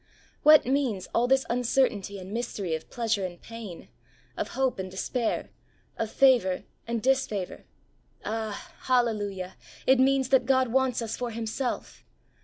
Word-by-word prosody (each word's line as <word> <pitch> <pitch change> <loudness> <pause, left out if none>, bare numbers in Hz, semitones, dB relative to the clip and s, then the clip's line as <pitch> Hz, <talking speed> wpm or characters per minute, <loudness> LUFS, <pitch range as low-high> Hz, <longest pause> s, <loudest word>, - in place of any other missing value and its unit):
What 305 0 +7
means 255 -7 0
all 240 +1 +3
this 265 +1 +3
uncertainty 240 -5 +1
and 190 0 -9
mystery 215 -7 -3
of 160 - -4
pleasure 225 -4 0
and 175 -2 -5
pain, 225 -6 -9 0.5
of - - -2
hope 265 -5 +1
and 190 0 -4
despair, 225 +5 -2 0.4
of 225 - -2
favour 240 -9 +4 0.2
and 235 -1 -2
disfavour? 255 -8 0 0.6
Ah, 220 -1 -4
hallelujah 205 -7 0 0.3
I - - +6
it 265 - +5
means 265 0 +3
that 260 -2 +4
God 260 -2 +3
wants 255 -1 +1
us 225 - -3
for 245 -1 -3
Himself. 230 +3 -4
235 Hz, 145 wpm, -27 LUFS, 205-260 Hz, 0.6 s, What